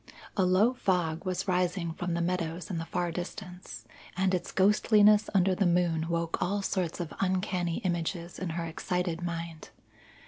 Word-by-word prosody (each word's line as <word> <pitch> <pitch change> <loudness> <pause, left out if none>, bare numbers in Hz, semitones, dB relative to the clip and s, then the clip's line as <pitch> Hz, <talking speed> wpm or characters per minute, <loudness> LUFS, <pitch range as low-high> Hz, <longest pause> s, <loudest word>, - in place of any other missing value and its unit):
A 195 - +3
low 195 +7 +4
fog 175 -7 0
was 185 +1 -2
rising 180 -2 0
from 175 0 -3
the 170 - 0
meadows 170 0 -2
in 170 - -2
the 165 - -4
far 175 -1 -1
distance, 180 - -7 0.3
and 190 0 +2
its 180 -1 -1
ghostliness 210 +1 +5
under 190 0 +4
the 190 0 +2
moon 170 -2 +2
woke 170 -1 -1
all 200 +3 0
sorts 185 -4 -1
of 170 -2 -4
uncanny 185 -2 0
images 170 -1 -2
in 185 - -3
her 170 - -2
excited 175 +1 -2
mind. 170 -2 -5
180 Hz, 165 wpm, -29 LUFS, 170-190 Hz, 0.3 s, ghostliness